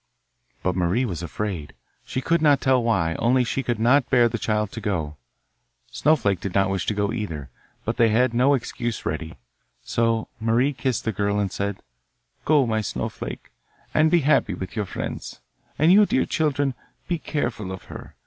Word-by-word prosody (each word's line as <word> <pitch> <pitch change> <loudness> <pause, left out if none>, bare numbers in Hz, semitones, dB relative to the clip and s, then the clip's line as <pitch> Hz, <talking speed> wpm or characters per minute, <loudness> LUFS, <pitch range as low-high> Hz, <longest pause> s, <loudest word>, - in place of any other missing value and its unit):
But 90 -1 0
Marie 95 +8 +1
was 90 -8 -4
afraid; 85 -3 -4 0.3
she 130 - -3
could 165 +4 +1
not 145 -3 +5
tell 130 -2 +3
why, 90 -8 +1
only 125 +2 +3
she 130 +2 -1
could 120 -3 -1
not 125 +4 +3
bear 120 -3 +5
the 115 - -3
child 105 -2 0
to 115 - -7
go. 80 -8 -2 0.7
Snowflake 110 - +2
did 95 0 -5
not 95 -1 +3
wish 95 -1 -2
to 105 - 0
go 100 +2 0
either, 80 - -5 0.3
but 115 +2 -2
they 115 -2 +5
had 120 +3 +2
no 130 +4 +4
excuse 120 -2 -4
ready. 80 +1 -3 0.5
So 115 -1 0
Marie 115 +6 +2
kissed 130 -1 -2
the 110 - +1
girl 100 0 0
and 100 -2 0
said: 100 0 -3 0.6
'Go, 145 -3 +4
my 110 -2 0
Snowflake, 105 - -5 0.4
and 155 +1 +4
be 170 0 +4
happy 135 -9 +2
with 95 +3 -7
your 105 -2 -1
friends, - - -6 0.4
and 155 +4 +5
you, 205 +2 +7
dear 260 - +2
children, 145 -4 0 0.3
be 170 -2 -1
careful 120 -11 -3
of 95 - -7
her. - - -11
115 Hz, 180 wpm, -24 LUFS, 100-130 Hz, 0.7 s, you